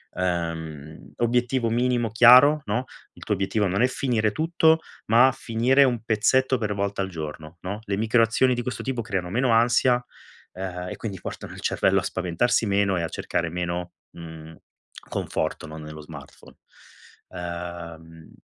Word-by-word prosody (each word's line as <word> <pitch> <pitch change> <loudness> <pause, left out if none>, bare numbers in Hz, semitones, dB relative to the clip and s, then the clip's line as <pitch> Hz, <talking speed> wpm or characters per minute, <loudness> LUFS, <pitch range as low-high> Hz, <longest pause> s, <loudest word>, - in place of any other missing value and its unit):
Uhm, 80 -4 -4
obiettivo 120 0 +1
minimo 120 -1 0
chiaro, 125 +6 +7
no? 115 +5 -1 0.3
Il - - -13
tuo 105 - -1
obiettivo 100 +2 0
non 95 +4 0
è 125 - +5
finire 120 -5 0
tutto, 160 +3 +2 0.3
ma 120 +4 +6
finire 125 +4 +3
un 120 -5 0
pezzetto 130 +4 +2
per 105 -2 -1
volta 100 0 -2
al 95 - -2
giorno, 80 -1 -8
no? 100 +3 -5
Le 100 -1 -2
micro 115 +2 +2
azioni 120 +3 +3
di 120 - -2
questo 125 +2 -5
tipo 130 -3 -2
creano 95 -6 -3
meno 125 +4 +1
ansia. 120 +2 +3 0.5
Ehm, 90 -1 -5
e - - -5
quindi 100 -4 -6
portano - - -7
il - - -10
cervello - - +2
a - - -5
spaventarsi 95 +8 0
meno 100 -1 +2
e - - -1
a 85 - -1
cercare 85 -1 -2
meno, 85 0 -4 0.2
mhmm, 80 -1 -11 0.5
conforto, 80 0 -3
no, 80 0 -9
nello 75 0 -9
smartphone. 75 -3 -13 0.7
Uhm... 85 -2 -8
100 Hz, 160 wpm, -24 LUFS, 85-120 Hz, 0.7 s, chiaro